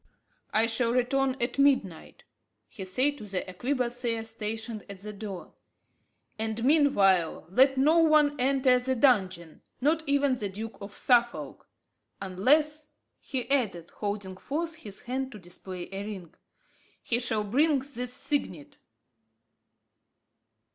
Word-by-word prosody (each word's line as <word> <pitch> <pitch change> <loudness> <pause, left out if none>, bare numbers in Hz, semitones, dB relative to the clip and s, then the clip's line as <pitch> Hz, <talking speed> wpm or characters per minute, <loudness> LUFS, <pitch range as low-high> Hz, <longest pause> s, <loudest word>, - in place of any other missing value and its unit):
"I 220 +1 +3
shall 230 +1 +1
return 260 +1 +1
at 240 +3 -1
midnight," 260 - +1 0.4
he 195 - -9
said 270 +9 0
to 215 - -8
the 190 -2 -4
arquebusier 240 +2 -2
stationed 225 0 -5
at 195 -1 -9
the 210 +1 -7
door; 200 -3 -8 0.9
"and 220 +1 -2
meanwhile 200 - +3
let 265 +5 +4
no 305 +5 +4
one 305 -2 +4
enter 255 -1 +3
the 260 +1 -1
dungeon 190 - +1 0.2
not 305 +5 +2
even 280 -2 +2
the 205 -4 -3
Duke 220 +4 -7
of 200 +1 -8
Suffolk 240 -1 +1 0.5
unless," 295 +11 +1 0.3
he 255 -4 -1
added, 200 -12 0
holding 200 -2 -5
forth 320 - -4
his 200 -2 -10
hand 260 +2 -3
to - - -8
display 180 -1 -9
a 195 +1 -5
ring, 190 -6 -8 0.7
"he 235 - +1
shall 225 -3 0
bring 285 +8 +3
this 255 -2 -6
signet." 250 - -3
240 Hz, 125 wpm, -28 LUFS, 200-270 Hz, 0.9 s, let